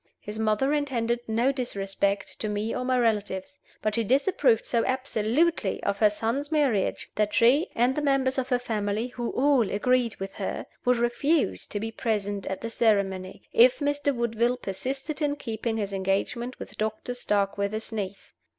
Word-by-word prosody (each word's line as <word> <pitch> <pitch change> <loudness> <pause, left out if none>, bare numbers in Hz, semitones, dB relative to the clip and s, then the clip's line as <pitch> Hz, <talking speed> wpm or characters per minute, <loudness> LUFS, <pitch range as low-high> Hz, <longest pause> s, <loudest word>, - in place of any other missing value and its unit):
His 210 +1 -7
mother 220 +6 +2
intended 240 -5 0
no 230 +4 +2
disrespect 200 -6 -2
to 215 - -2
me 210 +2 -2
or 250 - -2
my 255 0 +1
relatives, 210 +1 -1 0.2
but 215 - +1
she 230 - +1
disapproved 265 - +2
so 235 -2 +1
absolutely 260 - +1
of 200 0 -1
her 215 - +6
son's 230 +8 -2
marriage 275 -11 +1
that 210 -1 0
she 255 +8 +5
(and 245 +3 +3
the 300 - 0
members 270 -2 +2
of 260 0 -3
her 250 - +3
family, 220 -1 -2
who 240 -1 -4
all 265 -5 +3
agreed 245 +2 +1
with 195 0 -6
her) - - -4 0.2
would 250 0 +4
refuse 275 +7 +1
to 205 - -4
be 225 +2 -4
present 205 -3 -2
at 190 - -3
the 230 - -3
ceremony, 195 -5 0
if 245 +2 +6
Mr. 290 -1 0
Woodville 235 0 0
persisted 270 - -4
in 290 -1 +1
keeping 225 -4 -3
his 200 -2 -2
engagement 195 +6 -1
with - - -10
Dr. 220 +3 -2
Starkweather's 205 -2 -1
niece. 200 -3 -5
230 Hz, 170 wpm, -27 LUFS, 210-260 Hz, 0.2 s, her